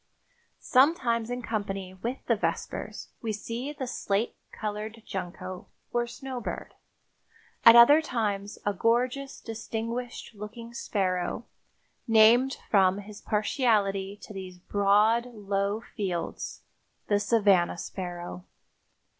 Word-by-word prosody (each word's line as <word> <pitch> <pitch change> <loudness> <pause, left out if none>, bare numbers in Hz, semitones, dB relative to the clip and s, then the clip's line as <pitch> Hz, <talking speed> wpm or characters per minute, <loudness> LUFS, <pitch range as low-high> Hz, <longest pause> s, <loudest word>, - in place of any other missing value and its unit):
Sometimes 250 -5 +3
in 245 0 -3
company 195 -4 -3
with 235 +8 -5
the 230 - +3
vespers 210 - -3
we 225 - -2
see 230 +6 -4
the 290 -3 -5
slate 215 -3 -1 0.2
colored 215 +1 -5
junco, 185 0 -6 0.3
or 240 0 +1
snow 260 +1 -6
bird; - - -5 0.9
at 230 - +10
other 285 +7 +9
times 205 -7 -2
a 205 - +2
gorgeous, 250 +7 0
distinguished 230 +2 -5
looking 220 +3 -9
sparrow, 185 -1 -1 0.6
named 230 +4 +6
from 190 -2 +5
his 205 0 -9
partiality 205 -3 +1
to - - -9
these 185 -2 -7
broad, 205 +5 +3
low 200 +1 -1
fields, 185 -5 -3 0.4
the 205 -1 +2
savanna 200 -5 +3
sparrow. 175 0 -6
215 Hz, 110 wpm, -28 LUFS, 195-235 Hz, 0.9 s, at